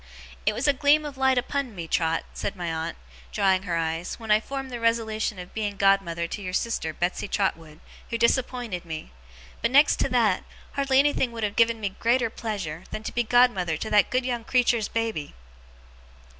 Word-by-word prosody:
'It - - +4
was - - -1
a 285 - +5
gleam 290 +3 +3
of 290 -2 -6
light 265 -1 +2
upon 255 -2 -2
me, 170 -2 -6
Trot,' 165 0 0
said 200 - -4
my 175 -3 -3
aunt, 160 - -4 0.3
drying 190 -1 +2
her 180 -3 -2
eyes, 165 +1 -2
'when 225 -2 -5
I 210 - +6
formed 270 +3 -6
the 240 - -4
resolution 220 -2 0
of 180 0 -9
being 205 -2 -3
godmother 195 -4 +2
to 205 - -6
your 185 -2 -5
sister 190 -6 -1
Betsey 175 +5 -2
Trotwood, 165 -6 -2 0.3
who 230 - -1
disappointed 235 -5 0
me; 160 - -7 0.5
but, - - +2
next 285 +4 +5
to - - 0
that, 225 -7 +2 0.3
hardly 275 -1 +1
anything 275 -3 +3
would 225 -1 -5
have 205 -1 -1
given 230 -1 +3
me 205 -2 -1
greater 235 0 +2
pleasure, 190 -9 -5
than 215 - -6
to - - -5
be 240 - +2
godmother 225 -9 +3
to 220 - -5
that 210 -1 +4
good 255 0 0
young 240 -2 -2
creature's 235 -3 +2
baby! 225 -10 -3
220 Hz, 195 wpm, -26 LUFS, 180-245 Hz, 0.5 s, I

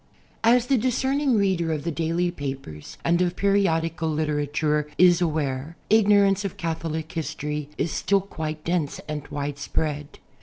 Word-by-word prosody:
D. 225 - +5
AS 245 0 +5
the 260 -1 +2
discerning 265 +2 +1
reader 185 -5 +1
of 150 -2 -2
the 170 - -1
daily 165 +2 0
papers 135 - -7
and 170 +1 +3
of 180 -1 +1
periodical 165 -5 +1
literature 150 0 0
is 180 -1 +6
aware 150 -2 -1
ignorance 200 -2 +5
of 195 - -4
Catholic 160 -1 -3
history 150 -2 -4
is 165 - -1
still 195 +1 +2
quite 155 -5 -5
dense 165 -4 -1
and 150 -1 -5
widespread. 145 +1 -3
165 Hz, 145 wpm, -25 LUFS, 150-195 Hz, -, is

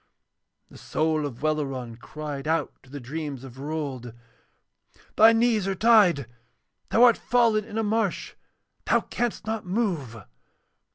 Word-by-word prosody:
And - - -15
the - - -16
soul 155 -1 0
of 125 0 -11
Welleran 135 -6 -2
cried 145 +2 -7
out 165 +1 0
to 135 - -21
the 145 +1 -7
dreams 140 0 -6
of 130 -1 -11
Rold: 140 -5 -5 1.0
'Thy 220 +1 +7
knees 225 -3 +2
are 195 - -1
tied! 200 - +4 0.6
Thou 230 - +4
art 240 -2 +6
fallen 230 -3 +2
in 220 -1 -7
a 225 - +1
marsh! 215 -2 -1 0.5
Thou - - +3
canst 240 -2 -3
not 220 0 -3
move.' 175 - -2
160 Hz, 145 wpm, -25 LUFS, 140-220 Hz, 1.0 s, Thy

